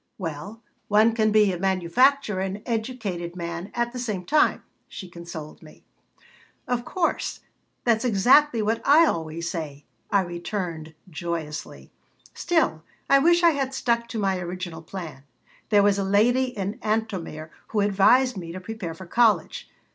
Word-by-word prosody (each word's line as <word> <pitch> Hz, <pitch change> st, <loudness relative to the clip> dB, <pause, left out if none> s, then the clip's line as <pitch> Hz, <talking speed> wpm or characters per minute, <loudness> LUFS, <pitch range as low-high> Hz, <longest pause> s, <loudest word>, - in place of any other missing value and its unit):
"Well, 180 Hz, +6 st, -6 dB, 0.2 s
one 215 Hz, +2 st, +4 dB
can 215 Hz, -1 st, +2 dB
be 210 Hz, -2 st, +4 dB
a 175 Hz, -, -5 dB
manufacturer 195 Hz, +5 st, +2 dB
and 195 Hz, +2 st, -4 dB
educated 220 Hz, -7 st, -3 dB
man 170 Hz, +2 st, -5 dB
at 240 Hz, 0 st, -1 dB
the 250 Hz, -, -5 dB
same 210 Hz, -7 st, -3 dB
time," 305 Hz, -, +2 dB, 0.2 s
she 190 Hz, -, -9 dB
consoled 170 Hz, -3 st, -9 dB
me 155 Hz, -, -16 dB, 0.8 s
"Of 245 Hz, -1 st, -1 dB
course. 340 Hz, +6 st, -2 dB, 0.4 s
That's 230 Hz, -1 st, +2 dB
exactly 245 Hz, +3 st, +4 dB
what 225 Hz, +2 st, 0 dB
I 310 Hz, +4 st, +6 dB
always 165 Hz, -, -2 dB
say," 150 Hz, -5 st, -5 dB, 0.2 s
I 200 Hz, -, +3 dB
returned, 170 Hz, -3 st, -5 dB
joyously. 165 Hz, -2 st, -6 dB, 0.4 s
"Still, 320 Hz, -, 0 dB, 0.3 s
I 275 Hz, -, +7 dB
wish 345 Hz, +4 st, +4 dB
I 340 Hz, -, +7 dB
had 270 Hz, -3 st, -2 dB
stuck 235 Hz, -2 st, 0 dB
to 230 Hz, -, -6 dB
my 195 Hz, -3 st, 0 dB
original 175 Hz, -2 st, -6 dB
plan. 165 Hz, -5 st, -8 dB, 0.5 s
There 205 Hz, -2 st, +5 dB
was 200 Hz, -1 st, +3 dB
a -, -, 0 dB
lady 225 Hz, +7 st, +3 dB
in 210 Hz, -4 st, -5 dB
Antomir 190 Hz, -8 st, -3 dB, 0.2 s
who 210 Hz, -, 0 dB
advised 210 Hz, +6 st, +4 dB
me 170 Hz, -3 st, -6 dB
to 185 Hz, -, -6 dB
prepare 185 Hz, -4 st, -6 dB
for 185 Hz, -, -10 dB
college. 215 Hz, -2 st, +1 dB
200 Hz, 150 wpm, -25 LUFS, 170-235 Hz, 0.8 s, I